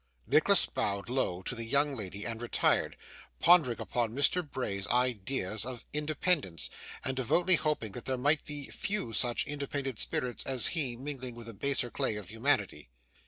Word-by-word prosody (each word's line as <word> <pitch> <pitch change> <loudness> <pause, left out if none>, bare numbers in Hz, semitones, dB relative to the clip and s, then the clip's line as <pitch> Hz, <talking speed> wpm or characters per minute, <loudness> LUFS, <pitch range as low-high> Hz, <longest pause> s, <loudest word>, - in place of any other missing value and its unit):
Nicholas - - +5
bowed 100 +1 -2
low 95 -8 -1
to - - -3
the 115 -1 -4
young 140 +5 +2
lady 100 -3 -5
and 115 0 -4
retired, 120 - +1 0.4
pondering 160 -9 +5
upon 120 -2 -1
Mr 145 +6 +3
Bray's 125 - -4
ideas 120 -4 0
of 125 -2 -6
independence, 150 - 0 0.3
and 130 - -1
devoutly 170 +9 +3
hoping 150 - +1
that 120 +4 -8
there 130 -1 -1
might 145 +4 +2
be 145 -1 -3
few 205 - -1
such 120 +1 +1
independent 140 -4 -4
spirits 125 -1 -1
as 130 -4 0
he 140 -8 +1
mingling 130 -1 -5
with 120 -1 -9
the 115 - -6
baser 125 +2 +1
clay 110 - -1
of 105 -3 -7
humanity. 110 - 0
125 Hz, 165 wpm, -31 LUFS, 110-145 Hz, 0.4 s, Nicholas